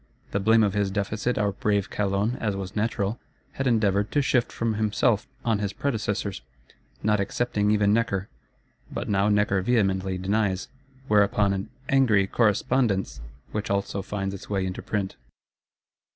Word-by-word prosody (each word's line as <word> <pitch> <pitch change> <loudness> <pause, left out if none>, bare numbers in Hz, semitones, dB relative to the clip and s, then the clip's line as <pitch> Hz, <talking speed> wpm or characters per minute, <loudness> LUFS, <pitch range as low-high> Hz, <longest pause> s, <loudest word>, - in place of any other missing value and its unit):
The 100 - 0
blame 110 +3 +4
of 100 -2 +1
his 100 -1 +1
Deficit 105 +5 -1
our 105 -1 +1
brave 100 +1 0
Calonne, 105 +3 0
as 105 -3 -1
was 95 -1 -6
natural, 105 0 -1 0.3
had 135 - -2
endeavoured 105 -4 +2
to 145 - +3
shift 125 -2 +1
from 115 -1 -1
himself 105 0 +1 0.2
on 110 -3 +2
his 100 -1 -2
predecessors; 105 - -2 0.6
not 105 -1 +2
excepting 105 +1 0
even 105 -1 +3
Necker. 105 -4 0 0.6
But - - -4
now 100 0 +2
Necker 105 -2 +2
vehemently 95 -4 +1
denies; 100 0 0 0.4
whereupon 105 -1 +3
an 95 0 -4 0.2
"angry 115 -8 +4
Correspondence," 105 - +1 0.3
which 105 -1 -3
also 100 0 -1
finds 95 0 -3
its 100 - -9
way 100 -2 0
into 95 0 -4
print. 100 -3 -3
105 Hz, 150 wpm, -26 LUFS, 100-110 Hz, 0.6 s, blame